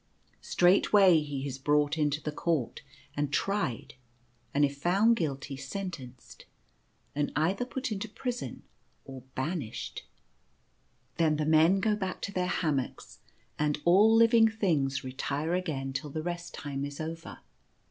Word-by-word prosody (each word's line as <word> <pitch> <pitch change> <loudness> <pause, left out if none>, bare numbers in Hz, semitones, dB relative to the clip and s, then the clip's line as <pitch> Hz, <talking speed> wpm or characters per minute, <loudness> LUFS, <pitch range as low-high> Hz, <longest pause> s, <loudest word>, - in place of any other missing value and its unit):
Straightway 185 0 +5
he 145 -2 -4
is 135 -1 -6
brought 145 +2 +2
into 150 -1 0
the 150 - -2
Court 150 -4 -1 0.3
and 145 -1 -1
tried, 195 - -1 0.6
and 145 +2 +3
if 140 0 -4
found 200 +8 +4
guilty 140 -6 -3
sentenced, 135 -3 -8 0.7
and 145 0 -1
either 180 +10 +1
put 260 -1 -4
into 210 +1 -3
prison 245 +3 -5 0.4
or 135 -1 -9
banished. 135 -4 -4 1.1
Then 160 -2 +3
the 150 - -1
men 160 +5 +5
go 215 +1 +2
back 190 -3 -4
to 200 - -3
their 180 -2 -1
hammocks, 150 -8 -2 0.4
and 150 -1 +1
all 195 +6 +6
living 230 0 +6
things 160 -11 0
retire 140 +5 -3
again 145 -7 -2
till 145 +3 -4
the 155 +2 -4
Rest 175 0 -5
Time 140 -2 -4
is 145 0 -6
over. 165 +1 -6
155 Hz, 135 wpm, -29 LUFS, 140-185 Hz, 1.1 s, all